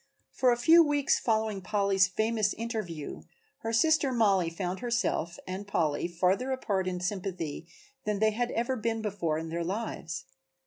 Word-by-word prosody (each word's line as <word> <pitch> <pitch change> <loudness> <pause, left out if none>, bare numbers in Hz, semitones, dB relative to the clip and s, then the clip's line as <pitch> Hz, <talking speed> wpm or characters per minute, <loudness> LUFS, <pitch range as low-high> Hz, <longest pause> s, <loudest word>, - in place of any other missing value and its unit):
For 255 -1 +3
a 240 - +2
few 330 +7 +7
weeks 290 -2 +2
following 220 -3 0
Polly's 195 -1 +2
famous 215 +1 0
interview 215 - -5 0.4
her 225 - -3
sister 290 +3 +3
Mollie 200 -8 +3
found 180 +2 -4
herself 235 -8 -1
and 190 +2 -5
Polly 160 -5 0
farther 185 +9 +1
apart 200 -8 -1
in 180 -1 -2
sympathy 180 -4 -4 0.4
than 210 -1 -1
they 215 +1 +3
had 240 +3 -1
ever 240 +3 -1
been 225 -1 -2
before 180 -7 -1
in 160 0 -5
their 170 +1 -2
lives. 175 -3 -4
205 Hz, 155 wpm, -29 LUFS, 180-230 Hz, 0.4 s, few